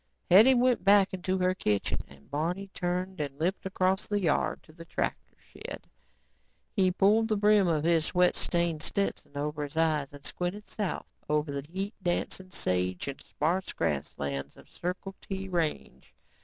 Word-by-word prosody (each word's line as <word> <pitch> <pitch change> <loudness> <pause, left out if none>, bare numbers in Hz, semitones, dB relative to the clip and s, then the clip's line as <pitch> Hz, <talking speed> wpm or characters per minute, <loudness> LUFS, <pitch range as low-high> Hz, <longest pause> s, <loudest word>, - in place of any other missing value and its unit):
Hetty 220 +8 +8
went 250 0 +3
back 200 -1 +5
into 185 0 -1
her 185 0 +2
kitchen 105 - 0
and 70 +1 -18
Barney 175 +7 -2
turned 180 0 -2
and 140 -2 -4
limped 180 +5 -1
across 190 +1 +1
the 205 -1 +1
yard 165 -6 +1
to 155 - -18
the 165 +1 -10
tractor 165 - -3
shed. - - -9 0.9
He 190 -3 +4
pulled 205 +4 +4
the 215 -2 +1
brim 205 -2 +5
of 155 -3 +1
his 165 -1 +3
sweat 180 +1 +3
stained 170 -3 0
Stetson 180 -5 -2
over 150 +1 -2
his 145 +2 -7
eyes 155 -4 +2
and 145 0 -13
squinted 185 +4 -4
south 205 -4 -3 0.2
over 150 0 +1
the 140 0 -4
heat 195 +3 -3
dancing 185 +1 -2
sage 90 - -1
and 140 - -5
sparse 175 +5 -1
grasslands 70 -1 -3
of - - -17
Circle 180 +2 -4
T 195 0 -5
range. 165 - -3
175 Hz, 165 wpm, -29 LUFS, 150-195 Hz, 0.9 s, Hetty